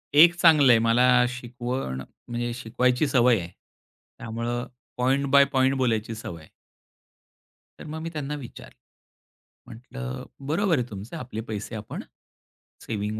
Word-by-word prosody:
एक 170 +3 +8
चांगलं 150 -7 +6
आहे. 115 - +6
मला 125 +2 +4
शिकवण 120 - -4 0.3
म्हणजे 120 0 -3
शिकवायची 125 +3 0
सवय 125 -4 +4
आहे. 85 -1 -7 0.7
त्यामुळे 115 +1 -3 0.3
पॉइंट 135 +3 +1
बाय 140 0 +7
पॉइंट 130 0 +3
बोलायची 115 -3 0
सवय 85 -7 -8
आहे. 80 - -17 1.3
तर - - -9
मग 160 +1 -5
मी 165 - -4
त्यांना 150 -1 -4
विचारलं. 135 -5 -11 0.9
म्हटलं 110 - -7 0.2
"बरोबर 170 +2 +2
आहे 125 - -1
तुमचं 100 +2 -8
आपले 115 -3 -6
पैसे 110 +2 -5
आपण 110 0 -6 0.8
सेव्हिंग 105 0 -3
120 Hz, 130 wpm, -25 LUFS, 115-135 Hz, 1.3 s, एक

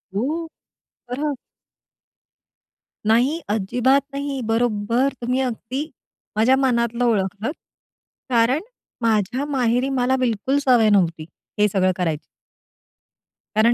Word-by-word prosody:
हो! 315 +9 -1 0.6
बरं. 285 +3 -2 1.7
नाही. 250 +9 +3
अजिबात 245 +7 +2
नाही. 280 -1 -3
बरोबर. 230 +3 +1
तुम्ही 250 +2 0
अगदी 260 +4 -3 0.5
माझ्या 250 +5 +5
मनातलं 240 -2 +1
ओळखलत. 205 - 0 0.8
कारण 245 +4 +3 0.4
माझ्या 230 +4 +1
माहेरी 255 -2 +1
मला 260 0 +1
बिलकुल 250 +2 0
सवय 235 -4 +5
नव्हती 170 -6 +2 0.3
हे 210 - +5
सगळं 190 -2 +2
करायची. 165 -4 -2 1.3
कारण 230 +2 +5
240 Hz, 95 wpm, -22 LUFS, 215-265 Hz, 1.7 s, माझ्या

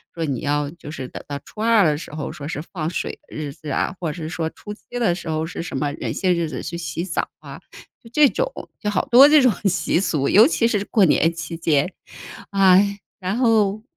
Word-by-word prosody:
说 165 - -2
你 135 -5 -2
要 145 0 -1
就 165 -3 -12
是 135 -4 -6
等 - - -9
到 140 -1 -4
初 215 - -9
2 225 -3 +4
的 150 -2 +3
时 - - -9
候 150 - -4
说 150 -3 -8
是 150 - -4
放 160 -3 -2
水 180 - -3 0.2
的 - - -10
日 145 -2 -4
子 150 - -10
啊， 145 - -1
或 165 - -1
者 - - -8
是 - - -4
说 160 0 -3
初 210 +5 -9
7 - - -17 0.2
的 225 -7 +2
时 170 -2 -7
候 155 0 -1
是 170 - -6
什 170 -5 -5
么 145 +1 -1
哪 - - -2
些 185 -1 +1
日 170 -2 -1
子 130 - -6
去 170 0 -5
洗 165 +1 -4
澡 175 - -2
啊， - - -10 0.4
就 230 - -14
这 295 +3 +6
种 - - -1 0.3
就 210 - -1
好 205 +3 0
多 275 +2 +8
这 305 - +7
种 250 -5 +5 0.2
习 180 -2 +1
俗， 160 -7 0
尤 220 +5 +7
其 230 -7 +1
是 205 -4 0
过 210 -3 +3
年 165 0 +3
期 165 0 -6
间， 160 +1 +1 0.6
啊。 190 -2 +5 0.4
然 190 +1 -2
后， 215 -4 +2
170 Hz, 250 characters per minute, -22 LUFS, 155-210 Hz, 0.6 s, 多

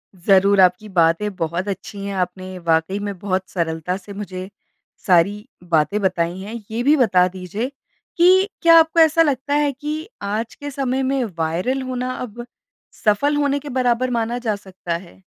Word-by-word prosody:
ज़रूर 195 +2 +4
आपकी 185 +4 +3
बातें 170 +2 +2
बहुत 170 +3 -2
अच्छी 200 0 -6
है। 200 - -4
आपने 185 +1 -5
वाक़ई 165 +3 0
में 205 -2 -4
बहुत 190 -1 -2
सरलता 165 +1 -2
से 200 +1 -11
मुझे 190 -2 -6 0.6
सारी 195 +4 +3 0.2
बातें 170 +3 +1
बताईं 180 -1 -1
है। 210 +4 -7 0.2
ये 230 +2 -2
भी 290 +4 +5
बता 185 -8 +4
दीजिए 190 - -5 0.5
कि 375 +3 +5
क्या 335 -1 +7
आपको 325 +1 +2
ऐसा 320 +1 +5
लगता 285 -2 0
है 295 -1 +2
कि 300 +4 -5
आज 210 +3 -3
के 290 0 -7
समय 265 -1 -1
में 265 -1 0
वाइरल 175 +12 -1
होना 255 0 -3
अब 240 0 -7 0.6
सफल 285 +8 +3
होने 285 -1 +1
के 290 +1 -9
बराबर 255 -1 +1
माना 235 +1 -1
जा 225 -4 -1
सकता 185 -4 -6
है? 175 +1 -16
205 Hz, 170 wpm, -21 LUFS, 185-260 Hz, 0.6 s, क्या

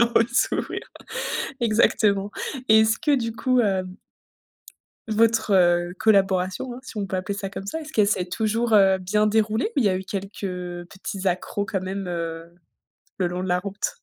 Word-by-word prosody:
Ouais, 230 - +6
s'ouvrir. 260 - 0 0.8
Exactement, 210 -3 +2 0.4
et 220 0 +8
est-ce 220 0 +3
que 300 -1 +1
du 230 -4 0
coup, 255 0 +2
hem 190 -3 0 1.1
votre, 225 0 +2
heu, 175 -1 +3
collaboration, 195 +2 +2
hein, - - -9
si 240 - -9
on 200 -1 -2
peut 190 - -3
appeler 200 +2 -3
ça 195 -1 -4
comme 195 - -7
ça, 320 +10 -4
est-ce 310 0 -9
qu'elle 210 -6 +3
s'est 185 -3 +1
toujours, 220 +4 -1
heu, 195 -2 +6
bien 210 +3 +1
déroulée 220 - +1
ou - - +3
il 230 - +2
y - - +5
a 185 - +1
eu 190 - -6
quelques, 195 +1 -6
heu, 180 -2 -4
petits 195 0 -5
accros 185 +3 -1
quand 195 -4 -2
même, 190 +1 -4
heu, 165 -1 -5 0.7
le 180 -2 +1
long 180 +1 -4
de 185 - -3
la 180 0 +2
route? 200 - -3
200 Hz, 190 wpm, -24 LUFS, 185-220 Hz, 1.1 s, et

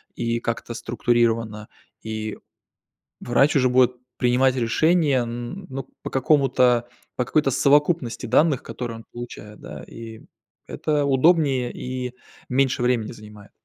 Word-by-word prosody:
и, 115 0 -1
как-то 115 0 -4
структурирована. 115 -2 0 0.4
И 110 -1 -4 0.8
врач 135 +5 +2
уже 130 -2 +3
будет 125 0 +4 0.2
принимать 125 +1 +3
решения, 140 +3 +2
н 120 +11 -6
ну, 135 -1 -6
по - - -5
какому-то 130 -3 +3 0.3
по 125 - 0
какой-то 150 0 +1
совокупности 140 -1 +2
данных, 150 -5 +3
которые 115 -2 -6
он 115 - -13
получает, 110 -3 -9
да, - - -9
и 115 -1 -10 0.5
это 150 -2 -1
удобнее, 135 -3 +3
и 125 -1 -5 0.4
меньше 130 -1 +1
времени 120 -3 0
занимает. 105 -2 -13
125 Hz, 125 wpm, -23 LUFS, 115-135 Hz, 0.8 s, будет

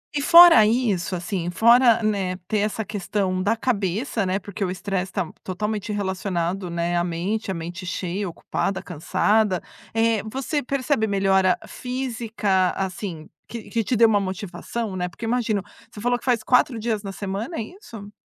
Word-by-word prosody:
e 285 - +1
fora 335 -5 +9
isso, 210 -5 +1
assim, 175 0 -3
fora, 235 +4 +5
né, 195 -4 0
ter 215 - 0
essa 210 +1 -1
questão 195 -2 -2
da 205 +4 +2
cabeça, 220 -1 -1
né, 185 +1 +1
porque 200 +1 -5
o 185 - -1
estresse 190 0 -3
tá 185 -5 -3
totalmente 210 +3 -3
relacionado, 190 -2 -2
né, 170 0 -1
à 175 - +2
mente, 180 +5 -2
a - - 0
mente 170 +3 -6
cheia, 185 +2 -3
ocupada, 190 +3 -3
cansada. 190 +4 +1 0.3
Eh, 225 -1 +2
você 275 +4 -2
percebe 265 -3 0
melhora 195 -2 +3
física 230 -7 -1
assim, 185 -4 -4 0.2
que 230 -2 -8
que 230 -1 0
te 245 - 0
deu 230 0 +6
uma 210 -2 +3
motivação, 195 +2 -4
né, 180 -1 -2
porque 175 +6 -8
imagino 225 -4 0 0.3
você 210 - -11
falou 245 +2 0
que - - -15
faz 240 -4 +1
4 250 +1 +3
dias 220 -1 -2
na 195 -1 -6
semana, 200 - -4
é - - -1
isso? 220 - -11
205 Hz, 170 wpm, -23 LUFS, 185-230 Hz, 0.3 s, fora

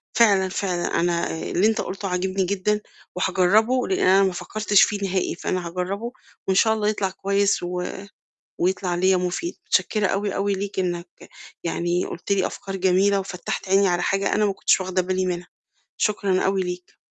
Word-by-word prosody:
فعلًا، 200 -5 +4
فعلًا 180 -2 -1
أنا 170 0 0
اللي 195 +5 +1
أنت 220 - +1
قُلته 195 +1 -5
عاجبني 185 +1 -1
جدًا، 200 +2 0 0.3
وهاجرَّبه 200 +7 +2
لإن 380 - 0
أنا 190 +1 +6
ما 190 -1 +1
فكّرتش 210 +2 +2
فيه 205 - +2
نهائي، 185 -2 -1
فأنا 180 0 -3
هاجرَّبه 190 +7 -3 0.4
وإن 190 - +2
شاء 220 +3 +4
الله 215 -1 -1
يطلَع 205 -2 -1
كويس 200 0 0
و 180 0 -3 0.8
ويطلَع 185 0 0
ليَّ 185 +2 +3
مفيد، 180 - -2
متشكرة 210 -2 +1
أوي، 200 +1 -1
أوي 200 +1 0
ليك 195 0 -5
إنّك 175 -1 -2 0.6
يعني 175 +1 0
قُلت 175 - -4
لي 195 -2 +2
أفكار 195 0 -6
جميلة، 190 +2 +3
وفتَّحت 185 0 -5
عيني 195 0 +4
على 175 0 0
حاجة 195 +2 +1
أنا 210 0 +2
ما 200 - +1
كنتش 195 - +2
واخدة 185 0 0
بالي 185 +1 -1
منها، 175 -1 -3 0.5
شكرًا 200 -3 +1
أوي 195 0 +1
ليك. 180 0 -6
190 Hz, 170 wpm, -23 LUFS, 180-200 Hz, 0.8 s, أنا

